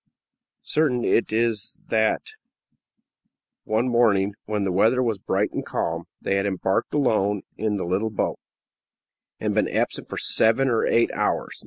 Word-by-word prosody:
Certain 135 Hz, -6 st, +1 dB
it 115 Hz, -, +2 dB
is 115 Hz, -1 st, -1 dB
that 110 Hz, -1 st, +1 dB, 1.4 s
one 110 Hz, +3 st, +1 dB
morning, 105 Hz, -5 st, +3 dB
when 105 Hz, -1 st, -1 dB
the 95 Hz, -, 0 dB
weather 110 Hz, +7 st, +3 dB
was 115 Hz, -5 st, -1 dB
bright -, -, 0 dB
and -, -, -3 dB
calm, 85 Hz, +1 st, -3 dB
they 100 Hz, -, 0 dB
had 100 Hz, +1 st, 0 dB
embarked 95 Hz, +4 st, -1 dB
alone 105 Hz, -8 st, +1 dB
in 105 Hz, 0 st, -1 dB
the 95 Hz, -, -3 dB
little 95 Hz, +5 st, 0 dB
boat, 105 Hz, -, -2 dB, 1.0 s
and -, -, -1 dB
been -, -, +1 dB
absent -, -, -2 dB
for -, -, -5 dB
seven 130 Hz, +4 st, +3 dB
or 115 Hz, -2 st, +1 dB
eight 115 Hz, -, +3 dB
hours. -, -, -1 dB
110 Hz, 150 wpm, -24 LUFS, 100-115 Hz, 1.4 s, morning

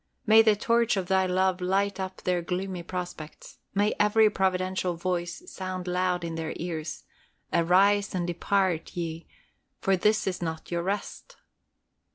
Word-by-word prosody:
May 220 Hz, 0 st, +8 dB
the 220 Hz, -2 st, +4 dB
torch 230 Hz, +1 st, +2 dB
of 185 Hz, -1 st, -3 dB
Thy 190 Hz, -1 st, +3 dB
love 185 Hz, 0 st, +1 dB
light 195 Hz, +2 st, 0 dB
up 190 Hz, 0 st, -5 dB
their 180 Hz, -1 st, +1 dB
gloomy 180 Hz, +1 st, -3 dB
prospects. 175 Hz, -3 st, -7 dB, 0.2 s
May 205 Hz, +1 st, +2 dB
every 210 Hz, +1 st, +5 dB
providential 185 Hz, -2 st, 0 dB
voice 175 Hz, -, -3 dB
sound 185 Hz, -, -6 dB
loud 180 Hz, 0 st, 0 dB
in 165 Hz, -1 st, -4 dB
their 160 Hz, -1 st, -3 dB
ears, 160 Hz, -2 st, -5 dB, 0.5 s
"Arise 195 Hz, +4 st, +3 dB
and 175 Hz, -1 st, 0 dB
depart 175 Hz, -1 st, 0 dB
ye, 165 Hz, -1 st, -4 dB, 0.5 s
for 195 Hz, -2 st, +2 dB
this 210 Hz, +4 st, +2 dB
is 185 Hz, -2 st, -2 dB
not 160 Hz, -1 st, -5 dB
your 170 Hz, 0 st, 0 dB
rest!" 195 Hz, +4 st, -4 dB
185 Hz, 150 wpm, -27 LUFS, 175-195 Hz, 0.5 s, May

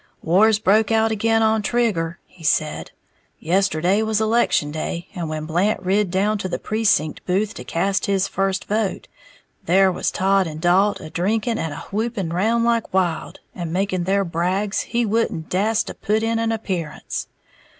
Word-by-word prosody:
"War's 205 Hz, +6 st, +4 dB
broke 215 Hz, +1 st, +3 dB
out 225 Hz, 0 st, +3 dB
again 225 Hz, +1 st, +2 dB
on 220 Hz, 0 st, +2 dB
Trigger," 200 Hz, -8 st, 0 dB
he 175 Hz, -, -18 dB
said; 155 Hz, 0 st, 0 dB, 0.5 s
"yesterday 185 Hz, +2 st, +1 dB
was 220 Hz, -1 st, 0 dB
election 220 Hz, -9 st, +2 dB
day, 170 Hz, +3 st, -4 dB
and 170 Hz, -3 st, -4 dB
when 155 Hz, 0 st, -4 dB
Blant 175 Hz, +7 st, +1 dB
rid 195 Hz, +1 st, +1 dB
down 200 Hz, +4 st, +1 dB
to 185 Hz, -, -3 dB
the -, -, -2 dB
precinct 210 Hz, -8 st, 0 dB
booth 200 Hz, +4 st, 0 dB
to -, -, -8 dB
cast 195 Hz, +4 st, -1 dB
his 195 Hz, -1 st, +1 dB
first 195 Hz, 0 st, -1 dB
vote, 210 Hz, -1 st, -2 dB, 0.6 s
there 190 Hz, +2 st, +4 dB
was -, -, -1 dB
Todd 195 Hz, -1 st, +2 dB
and 155 Hz, -1 st, -7 dB
Dalt 190 Hz, +5 st, +3 dB
a 155 Hz, -, -9 dB
drinking 220 Hz, +5 st, 0 dB
and 160 Hz, -, -2 dB
a -, -, -7 dB
whooping 215 Hz, -3 st, -2 dB
round 220 Hz, +7 st, +1 dB
like 235 Hz, -1 st, +1 dB
wild, 180 Hz, -3 st, -1 dB
and 170 Hz, -3 st, -5 dB
making 185 Hz, -1 st, -1 dB
their 195 Hz, +1 st, +1 dB
brags 185 Hz, +5 st, -1 dB
he 240 Hz, 0 st, -1 dB
wouldn't 215 Hz, -7 st, -1 dB
dast 210 Hz, +4 st, +1 dB
to -, -, -6 dB
put 215 Hz, +2 st, -1 dB
in 225 Hz, 0 st, 0 dB
an 225 Hz, 0 st, 0 dB
appearance. 185 Hz, -8 st, -4 dB
195 Hz, 170 wpm, -21 LUFS, 175-220 Hz, 0.6 s, War's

